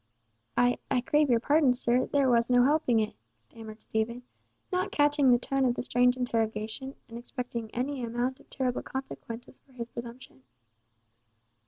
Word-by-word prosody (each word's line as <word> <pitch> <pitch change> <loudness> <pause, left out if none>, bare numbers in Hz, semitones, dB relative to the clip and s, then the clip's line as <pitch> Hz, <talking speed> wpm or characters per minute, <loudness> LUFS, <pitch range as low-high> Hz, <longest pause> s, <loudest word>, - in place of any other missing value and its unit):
"I—I 245 +1 +2
crave 295 +3 +2
your 235 -2 +4
pardon, 285 +1 +4
sir, 245 0 +1
there 280 -2 +2
was 235 -1 +3
no 245 0 +5
helping 275 -4 +3
it," 215 - -2 0.2
stammered 215 - -12
Stephen, 235 +3 -2 0.5
not 370 +2 0
catching 290 -2 +3
the 245 - +6
tone 270 +2 0
of 245 -2 +2
the - - -3
strange 250 0 +3
interrogation, 225 +2 -2
and 230 0 -8
expecting 240 -2 -5
any 255 +3 -3
amount 240 +3 -2
of - - -21
terrible 255 -2 -1
consequences 255 -2 -7
for 270 - -26
his 235 -2 -6
presumption. 235 - -9
245 Hz, 155 wpm, -29 LUFS, 235-265 Hz, 0.5 s, the